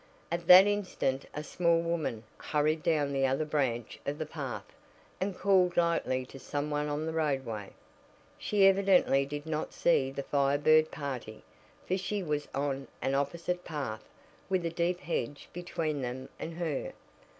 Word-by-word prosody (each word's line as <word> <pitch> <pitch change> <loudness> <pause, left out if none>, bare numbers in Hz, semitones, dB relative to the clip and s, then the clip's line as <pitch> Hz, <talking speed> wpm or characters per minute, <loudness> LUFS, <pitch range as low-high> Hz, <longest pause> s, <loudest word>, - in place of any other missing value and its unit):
At 170 0 -2
that 185 +2 +11
instant 185 -10 -1
a 150 - -5
small 170 +1 +2
woman 165 -9 -2 0.2
hurried 155 +1 +1
down 150 -4 +1
the 135 -1 +2
other 135 +4 0
branch 130 -6 -1
of 145 +1 -3
the 155 - -3
path, 145 -5 -5 0.5
and 190 0 -2
called 185 -2 +3
lightly 165 -7 +1
to 135 - -12
some 145 +2 -3
one 150 0 0
on 150 +1 -2
the 160 - -3
roadway. 135 -10 -1 0.7
She 205 -2 +3
evidently 190 -8 +4
did 145 +1 -5
not 155 -1 -3
see 135 -6 +2
the 140 +1 -5
Fire 140 0 +2
Bird 155 +2 +5
party, 130 -6 -6 0.4
for 185 +1 0
she 200 +1 -2
was 150 -3 -2
on 140 -1 -2
an 135 - -1
opposite 170 +6 -1
path, 140 -9 -4 0.5
with 185 -3 +1
a 165 - -1
deep 175 +1 0
hedge 145 -3 -3
between 165 -4 -3
them 130 +1 -5
and 165 - -5
her. 165 -5 -3
150 Hz, 160 wpm, -30 LUFS, 135-170 Hz, 0.7 s, that